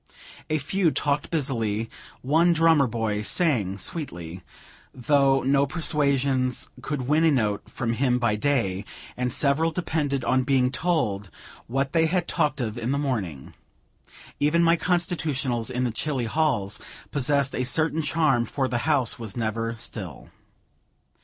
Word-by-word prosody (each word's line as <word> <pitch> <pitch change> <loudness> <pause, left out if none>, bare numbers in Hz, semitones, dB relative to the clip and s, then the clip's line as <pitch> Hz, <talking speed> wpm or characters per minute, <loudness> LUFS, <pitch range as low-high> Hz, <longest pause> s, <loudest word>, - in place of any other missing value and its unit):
A 155 - +1
few 170 +5 +1
talked 145 +1 -1
busily; 115 -8 -1 0.4
one 165 +6 +4
drummer 160 -4 +4
boy 110 -3 -2
sang 105 - +1
sweetly, 90 - -5 0.5
though 135 +1 +3
no 140 +2 +3
persuasions 140 -5 +1
could 140 0 -3
win 150 +5 +2
a 165 - +5
note 110 -8 0
from 115 -2 -2
him 125 +1 +1
by 120 -4 +1
day; 105 -6 0 0.3
and 125 0 -1
several 145 +5 +2
depended 150 -6 -2
on 130 - +3
being 130 -1 +2
told 120 - -1 0.4
what 135 +3 -1
they 165 -1 +3
had 175 +1 0
talked 150 -1 0
of 115 -1 -3
in 115 +1 -3
the 140 - +1
morning. 105 - -3 0.9
Even 160 +4 +3
my 165 0 +5
constitutionals 155 -9 -1
in 125 0 -1
the 125 - 0
chilly 130 +1 -2
halls, 115 -7 0 0.3
possessed 140 -1 +1
a 125 - -1
certain 155 +5 +1
charm, 150 -5 +2
for 135 +1 -1
the 120 -2 -1
house 140 -3 +1
was 115 -1 -6
never 115 0 -2
still. 105 - -7
135 Hz, 145 wpm, -25 LUFS, 115-150 Hz, 0.9 s, a